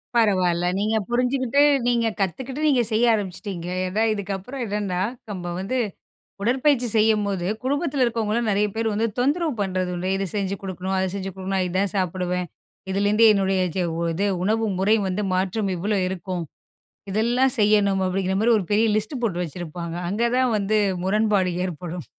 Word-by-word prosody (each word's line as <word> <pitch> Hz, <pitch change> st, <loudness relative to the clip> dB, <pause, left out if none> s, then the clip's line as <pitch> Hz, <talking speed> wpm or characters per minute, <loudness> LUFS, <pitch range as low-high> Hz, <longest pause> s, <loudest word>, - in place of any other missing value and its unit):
பரவால்ல. 185 Hz, -6 st, +3 dB
நீங்க 215 Hz, +2 st, +1 dB
புரிஞ்சுகிட்டு, 255 Hz, +2 st, +1 dB, 0.3 s
நீங்க 235 Hz, -2 st, +2 dB
கத்துக்கிட்டு, 260 Hz, -, -3 dB
நீங்க 260 Hz, -4 st, +4 dB
செய்ய 225 Hz, +2 st, +3 dB
ஆரம்பிச்சிட்டீங்க. 190 Hz, -3 st, -4 dB, 0.2 s
ஏன்னா 210 Hz, +4 st, 0 dB
இதுக்கப்புறம் 200 Hz, +6 st, -5 dB
என்னன்னா, 200 Hz, -4 st, -2 dB, 0.3 s
நம்ம 175 Hz, -3 st, -5 dB
வந்து 195 Hz, +7 st, -2 dB, 0.7 s
உடற்பயிற்சி 255 Hz, +2 st, +2 dB
செய்யும்போது 210 Hz, -4 st, +2 dB, 0.2 s
குடும்பத்தில 285 Hz, 0 st, 0 dB
இருக்கவங்களும் 230 Hz, -1 st, 0 dB
நெறைய 205 Hz, +1 st, +2 dB
பேர் 225 Hz, -1 st, 0 dB
வந்து 220 Hz, +2 st, +1 dB
தொந்தரவு 300 Hz, +5 st, +1 dB
பண்ணுறது 185 Hz, -2 st, -1 dB
உண்டு. 180 Hz, +1 st, -3 dB
இத 195 Hz, -, -1 dB
செஞ்சு 195 Hz, -1 st, -1 dB
கொடுக்கணும். 190 Hz, 0 st, -4 dB
அதை 190 Hz, -, +1 dB
செஞ்சு 195 Hz, -1 st, -4 dB
கொடுக்கணும். 190 Hz, 0 st, -2 dB
இதுதான் 185 Hz, +2 st, 0 dB
சாப்பிடுவேன். 180 Hz, -1 st, -1 dB, 0.4 s
இதுலேருந்து 205 Hz, +3 st, +3 dB
என்னுடைய 195 Hz, -2 st, +1 dB, 0.2 s
சே 185 Hz, -, +1 dB, 0.3 s
இது 195 Hz, +5 st, -1 dB, 0.2 s
உணவு 220 Hz, +3 st, +1 dB
முறை 200 Hz, +3 st, +3 dB
வந்து 190 Hz, +3 st, -1 dB
மாற்றம் 195 Hz, +2 st, 0 dB
இவ்ளோ 200 Hz, +3 st, 0 dB
இருக்கும். 185 Hz, -1 st, -4 dB, 0.7 s
இதெல்லாம் 240 Hz, +6 st, +2 dB
செய்யணும் 205 Hz, -2 st, +3 dB
அப்படிங்கிற 190 Hz, 0 st, -1 dB
மாதிரி 230 Hz, +2 st, +4 dB
ஒரு 205 Hz, -, -1 dB
பெரிய 215 Hz, +2 st, +4 dB
லிஸ்ட் 215 Hz, +5 st, -2 dB
போட்டு 180 Hz, -6 st, 0 dB
வச்சிருப்பாங்க. 170 Hz, +1 st, -6 dB
அங்கே 220 Hz, +5 st, +1 dB
தான் 255 Hz, -2 st, +2 dB
வந்து 205 Hz, +1 st, +1 dB, 0.3 s
முரண்பாடு 205 Hz, -1 st, +2 dB, 0.2 s
ஏற்படும். 175 Hz, -1 st, -6 dB
200 Hz, 150 wpm, -23 LUFS, 185-225 Hz, 0.7 s, நீங்க